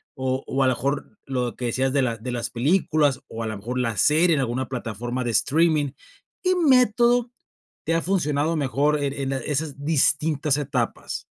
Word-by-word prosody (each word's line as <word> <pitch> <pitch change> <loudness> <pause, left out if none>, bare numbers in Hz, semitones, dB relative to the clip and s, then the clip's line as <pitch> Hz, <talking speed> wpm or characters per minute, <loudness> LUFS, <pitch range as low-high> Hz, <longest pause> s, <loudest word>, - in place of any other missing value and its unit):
o 130 0 -2
o 135 +1 +1
a - - +3
lo - - +4
mejor 140 - -3
lo 125 -4 -2
que 125 - -5
decías 130 +3 0
de 140 - +3
las 115 -4 -2
de 125 - -3
las 120 -1 -3
películas, 145 0 +1
o 115 0 -6
a - - -3
lo 110 - -4
mejor 120 +6 -5
la 115 -3 -1
serie 165 - +4
en - - 0
alguna 130 0 -1
plataforma 120 0 -4
de 120 - -1
streaming. 150 +4 +2 0.5
¿Qué 370 0 +3
método 245 - +3 0.5
te 165 - 0
ha 165 - +1
funcionado 160 -4 0
mejor 145 +1 +1
en 140 -1 -1
en 135 -1 -3
esas 145 -1 -3
distintas 150 -1 +1
etapas? 130 -5 -3
140 Hz, 185 wpm, -24 LUFS, 125-155 Hz, 0.5 s, lo